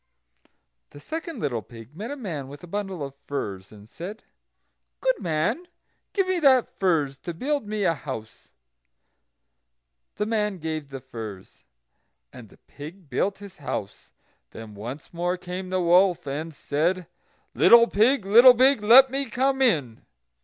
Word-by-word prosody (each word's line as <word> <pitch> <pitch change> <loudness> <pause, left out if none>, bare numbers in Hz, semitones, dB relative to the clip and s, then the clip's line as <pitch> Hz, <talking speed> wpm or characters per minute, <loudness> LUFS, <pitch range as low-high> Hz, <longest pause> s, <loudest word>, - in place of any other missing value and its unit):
The 145 - -13
second 320 - -6
little 120 -6 -1
pig 115 +5 -14
met 215 +7 -6
a 285 - -4
man 170 - -5
with 145 +3 -12
a - - -9
bundle 195 -3 -4
of 135 - -9
furze, 100 -9 -5
and 105 -1 -14
said: 185 - -9 0.8
"Good - - +1
man, 175 - -1 0.4
give 390 -2 0
me 370 -1 0
that 265 -6 +3
furze 150 -8 +1
to 175 -2 -6
build 280 - -2
me 210 -1 -2
a 170 - +3
house." 125 -7 -8 1.7
The 210 - -1
man 210 -3 -1
gave 155 -3 -5
the 135 -1 -8
furze, 110 -7 -10 0.7
and 115 -4 -12
the - - -20
pig 155 +2 -12
built 195 +10 0
his 200 -1 -12
house. 100 -8 -6 0.4
Then 110 - -10
once 120 +11 -8
more 175 +2 -1
came 180 +1 -6
the 185 0 0
wolf, 175 0 +3
and 150 +4 -4
said: 165 +5 -1 0.5
"Little 235 0 +7
pig, 230 +2 +2
little 240 +5 +8
pig, 260 -1 +4
let 250 +5 +7
me 275 0 -2
come 265 +1 0
in." 145 - +1
180 Hz, 155 wpm, -25 LUFS, 140-225 Hz, 1.7 s, little